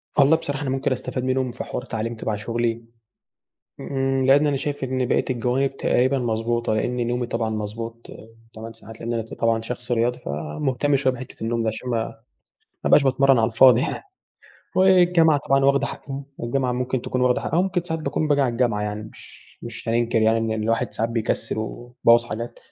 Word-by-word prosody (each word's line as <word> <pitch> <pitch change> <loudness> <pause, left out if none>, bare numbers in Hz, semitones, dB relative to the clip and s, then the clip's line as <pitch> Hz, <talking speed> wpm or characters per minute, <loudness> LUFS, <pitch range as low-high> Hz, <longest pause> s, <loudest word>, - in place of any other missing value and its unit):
والله 145 +2 +5
بصراحة، 145 -3 -4
أنا 135 - -2
ممكن 135 0 -1
أستفاد 125 0 -3
منهم 130 -1 0
في 125 - -6
حوار 125 - -5
تعليم 115 -1 -3
تَبَع 110 -1 -3
شغلي. 115 +2 -2 1.0
امم، 135 -1 -1
لأن 145 +3 +5
أنا 140 - +1
شايف 145 0 -4
إن 130 -1 -1
بقية - - +1
الجوانب 130 +3 0
تقريبًا 130 +2 +2
مضبوطة، 115 0 -1
لأن 120 +2 -1
نومي 120 0 -1
طبعًا 115 -1 -1
مضبوط، 115 +2 -5 0.5
8 110 +1 -8
ساعات. 115 0 -13
لأن 115 +1 -3
أنا 115 - 0
ط 110 - -11
طبعًا 115 -1 +1
شخص 125 +2 -6
رياضي 120 +1 +1
فمهتم 125 - -1
شوية 130 -1 +2
بحتّة 125 -3 -9
النوم 115 +1 -1
دي، 115 - -1
عشان 110 +3 -4
ما 115 -2 0 0.8
ما - - +1
أبقاش 145 - +6
باتمرن 135 0 +4
على 110 - +4
الفاضي 125 +1 +6
يعني 165 - -3 0.7
والجامعة 175 -5 +5
طبعًا 135 0 +3
واخدة 140 0 +3
حقّ - - -8 0.4
الجامعة 125 +1 0
ممكن 125 0 -2
تكون 130 - -2
واخدة 125 -1 +2
حقّها، 165 - -1
وممكن 185 -1 +1
ساعات 160 -2 -3
باكون 155 0 -1
باجي 145 -1 +3
على 130 -3 +2
الجامعة 115 -3 0
يعني 105 0 -3
مش - - -17
مش - - -8
هننكر 115 -1 +1
يعني 110 +1 +3
إن 115 0 -1
الواحد 115 +1 0
ساعات 115 - -1
بيكسل، 115 -1 -2
ويبوظ 120 +1 +1
حاجات، 115 +1 -6
125 Hz, 190 wpm, -23 LUFS, 115-135 Hz, 1.0 s, أبقاش